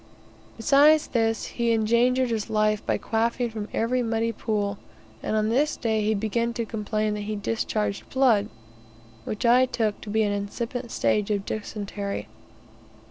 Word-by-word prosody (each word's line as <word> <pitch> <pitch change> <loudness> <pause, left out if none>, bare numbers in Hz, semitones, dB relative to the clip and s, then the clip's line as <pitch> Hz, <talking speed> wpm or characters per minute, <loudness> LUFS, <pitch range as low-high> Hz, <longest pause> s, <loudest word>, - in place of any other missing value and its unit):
Besides 290 +6 +5
this, 225 -2 0
he 235 -1 -1
endangered 235 +3 +2
his 220 -1 -2
life 215 -1 +1
by - - 0
quaffing 235 +1 -1
from 215 -1 -5
every 250 +3 0
muddy 230 -1 0
pool; 205 -2 -2 0.4
and - - -2
on 215 0 +1
this 280 +6 +1
day 220 -2 0
he 215 +1 +1
began 230 +3 -1
to 235 -1 -2
complain 215 0 -2
that 210 - -3
he 215 - -1
discharged 210 0 -2
blood, 235 -6 +3 0.8
which 215 +4 -3
I 250 +2 +5
took 220 -4 -1
to 215 - -8
be 220 +1 +2
an 205 - +1
incipient 235 +5 -4
stage 210 -2 +1
of 200 -2 -1
dysentery. 205 -1 -4
225 Hz, 155 wpm, -25 LUFS, 210-235 Hz, 0.8 s, Besides